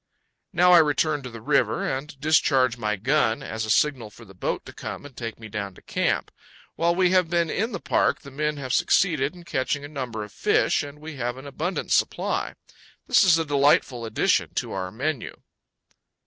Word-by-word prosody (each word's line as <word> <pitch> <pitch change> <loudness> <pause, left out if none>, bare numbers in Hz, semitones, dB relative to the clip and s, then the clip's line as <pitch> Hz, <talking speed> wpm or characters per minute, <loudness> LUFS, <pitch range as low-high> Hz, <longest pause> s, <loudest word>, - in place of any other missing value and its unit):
Now 180 +1 +4
I 175 - +9
return 150 -1 +2
to 130 - -7
the 115 -1 -10
river 130 -3 +1
and 140 +2 -4
discharge 135 -5 +3
my 105 -3 -1
gun, 115 +1 +1
as 110 0 -4
a - - -7
signal 125 -2 +2
for 115 +2 -15
the 95 - -15
boat 90 - -3
to - - -10
come - - -7
and 140 -3 -12
take 115 -2 -6
me 110 - -9
down 100 -3 -5
to - - -16
camp. - - -1 0.4
While 170 +1 +1
we 180 0 +3
have 185 -3 +3
been 170 -1 +1
in 225 +5 -1
the - - -4
park - - +1
the 140 - -12
men 150 +2 -2
have 130 -3 -4
succeeded 155 -2 +2
in 175 - -12
catching 140 -2 -2
a - - -6
number 125 -7 -5
of 105 - -11
fish, - - +2
and 145 0 -8
we 155 -1 -9
have 120 0 -3
an 135 - -10
abundant 160 +6 -4
supply. - - 0 0.5
This - - +5
is 175 -4 +5
a 165 - -1
delightful 140 -4 +2
addition 110 - +1
to - - -2
our 95 -1 -3
menu. 135 +5 -4
140 Hz, 205 wpm, -25 LUFS, 115-155 Hz, 0.5 s, I